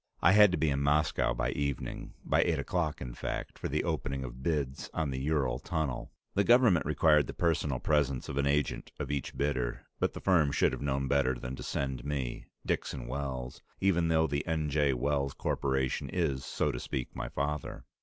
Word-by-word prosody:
I 85 Hz, -, +5 dB
had 105 Hz, -1 st, +7 dB
to 90 Hz, -, 0 dB
be 75 Hz, -1 st, +2 dB
in 70 Hz, 0 st, 0 dB
Moscow 75 Hz, +2 st, +2 dB
by 60 Hz, +1 st, 0 dB
evening, 70 Hz, -1 st, -3 dB
by -, -, +3 dB
eight 85 Hz, -2 st, +1 dB
o'clock, 75 Hz, +2 st, -1 dB
in 60 Hz, -2 st, -5 dB
fact, -, -, -5 dB
for -, -, -2 dB
the -, -, 0 dB
opening 70 Hz, -1 st, -2 dB
of 65 Hz, 0 st, -8 dB
bids 70 Hz, -3 st, -2 dB
on 80 Hz, -4 st, 0 dB
the 65 Hz, -, -3 dB
Ural 65 Hz, -4 st, 0 dB
Tunnel. 75 Hz, -4 st, -3 dB, 0.2 s
The 100 Hz, -, +3 dB
Government 115 Hz, -, +5 dB
required 75 Hz, -1 st, +4 dB
the -, -, -6 dB
personal 80 Hz, -5 st, +1 dB
presence 70 Hz, -2 st, +1 dB
of -, -, -5 dB
an 70 Hz, -, +2 dB
agent 70 Hz, 0 st, 0 dB
of 75 Hz, -2 st, -3 dB
each 70 Hz, -2 st, -3 dB
bidder, 65 Hz, -4 st, -1 dB
but -, -, +1 dB
the -, -, -6 dB
firm 80 Hz, -7 st, +3 dB
should 70 Hz, -, +3 dB
have -, -, -5 dB
known 70 Hz, -1 st, 0 dB
better 65 Hz, -1 st, +2 dB
than 60 Hz, +2 st, -5 dB
to -, -, -9 dB
send 65 Hz, -3 st, -3 dB
me, 70 Hz, -4 st, -3 dB, 0.2 s
Dixon 60 Hz, -, -2 dB
Wells, 65 Hz, -1 st, -4 dB, 0.2 s
even 85 Hz, -4 st, +3 dB
though 80 Hz, 0 st, +3 dB
the 70 Hz, -2 st, -1 dB
N. 80 Hz, -3 st, 0 dB
J. 75 Hz, -1 st, +3 dB
Wells 70 Hz, +2 st, 0 dB
Corporation 65 Hz, 0 st, -1 dB
is, 70 Hz, -7 st, 0 dB
so 75 Hz, -, 0 dB
to -, -, -4 dB
speak, 65 Hz, 0 st, -4 dB
my -, -, -4 dB
father. 75 Hz, 0 st, -3 dB
70 Hz, 200 wpm, -31 LUFS, 65-75 Hz, 0.2 s, had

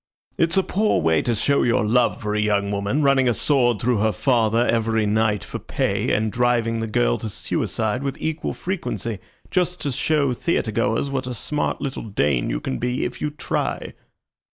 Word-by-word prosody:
It's 165 Hz, +2 st, +1 dB
a 190 Hz, -, +4 dB
poor 210 Hz, +4 st, +1 dB
way 80 Hz, 0 st, +2 dB
to 120 Hz, -, 0 dB
show 140 Hz, +6 st, +2 dB
your 115 Hz, -2 st, +2 dB
love 120 Hz, +3 st, +2 dB
for 105 Hz, 0 st, -1 dB
a 105 Hz, -, 0 dB
young 100 Hz, -1 st, +1 dB
woman, 100 Hz, +9 st, 0 dB
running 135 Hz, -2 st, +4 dB
a 120 Hz, -, +1 dB
sword 120 Hz, -6 st, +2 dB
through 120 Hz, -1 st, +1 dB
her 110 Hz, +1 st, +2 dB
father 115 Hz, -2 st, +2 dB
every 115 Hz, -2 st, +1 dB
night 105 Hz, 0 st, +1 dB
for -, -, -6 dB
pay, -, -, -1 dB
and 110 Hz, 0 st, +1 dB
driving 120 Hz, -1 st, +1 dB
the 115 Hz, -, -2 dB
girl -, -, +1 dB
to 110 Hz, -, -4 dB
suicide 110 Hz, +3 st, -2 dB
with 140 Hz, -1 st, -3 dB
equal 160 Hz, 0 st, -3 dB
frequency, 140 Hz, -, -3 dB, 0.3 s
just 180 Hz, -1 st, 0 dB
to 145 Hz, -, -1 dB
show 140 Hz, 0 st, +1 dB
theatre 120 Hz, -4 st, -1 dB
goers 115 Hz, +6 st, 0 dB
what 130 Hz, -2 st, -2 dB
a 125 Hz, -, -4 dB
smart 150 Hz, +7 st, -2 dB
little 140 Hz, -1 st, -3 dB
Dane 75 Hz, -, 0 dB
you -, -, -1 dB
can 65 Hz, -, -4 dB
be 125 Hz, +1 st, -1 dB
if -, -, -6 dB
you 150 Hz, -, 0 dB
try." 150 Hz, +1 st, -3 dB
120 Hz, 195 wpm, -22 LUFS, 105-140 Hz, 0.3 s, a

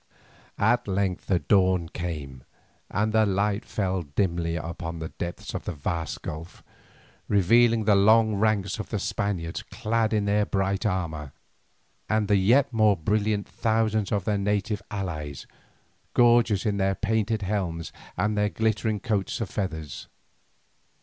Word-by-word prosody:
At 120 Hz, +3 st, +2 dB
length 95 Hz, -1 st, -1 dB
the 95 Hz, -, +3 dB
dawn 95 Hz, -2 st, +2 dB
came, 75 Hz, -7 st, -6 dB, 0.5 s
and 110 Hz, +1 st, 0 dB
the 110 Hz, 0 st, +5 dB
light 100 Hz, +1 st, 0 dB
fell 95 Hz, -3 st, -1 dB
dimly 85 Hz, +2 st, -1 dB
down 85 Hz, +1 st, -5 dB
the 80 Hz, 0 st, -5 dB
depths 85 Hz, 0 st, -5 dB
of -, -, -5 dB
the -, -, -3 dB
vast 80 Hz, +1 st, -4 dB
gulf, 80 Hz, +3 st, -7 dB, 0.6 s
revealing 115 Hz, +3 st, +4 dB
the 105 Hz, 0 st, +4 dB
long 110 Hz, +2 st, +5 dB
ranks 105 Hz, -1 st, +1 dB
of 110 Hz, -, -5 dB
the 110 Hz, -, -1 dB
Spaniards 95 Hz, -4 st, -2 dB
clad 110 Hz, 0 st, -1 dB
in 105 Hz, -2 st, +1 dB
their 105 Hz, 0 st, +2 dB
bright 95 Hz, +2 st, 0 dB
armour, 80 Hz, -7 st, -3 dB, 0.8 s
and 110 Hz, -1 st, +1 dB
the 100 Hz, -, +4 dB
yet 120 Hz, +8 st, +3 dB
more 110 Hz, -3 st, +4 dB
brilliant 105 Hz, +4 st, 0 dB
thousands 110 Hz, -2 st, 0 dB
of 100 Hz, -3 st, 0 dB
their 105 Hz, -2 st, +1 dB
native 105 Hz, +1 st, -1 dB
allies, 80 Hz, -9 st, -5 dB, 0.7 s
gorgeous 120 Hz, -3 st, +4 dB
in 105 Hz, -2 st, +1 dB
their 95 Hz, 0 st, +1 dB
painted 110 Hz, 0 st, 0 dB
helms 90 Hz, -5 st, -2 dB, 0.2 s
and 105 Hz, 0 st, +1 dB
their 105 Hz, 0 st, +2 dB
glittering 110 Hz, -1 st, 0 dB
coats 105 Hz, 0 st, -1 dB
of 115 Hz, -, -4 dB
feathers. 80 Hz, -7 st, -4 dB
100 Hz, 145 wpm, -26 LUFS, 90-110 Hz, 0.8 s, the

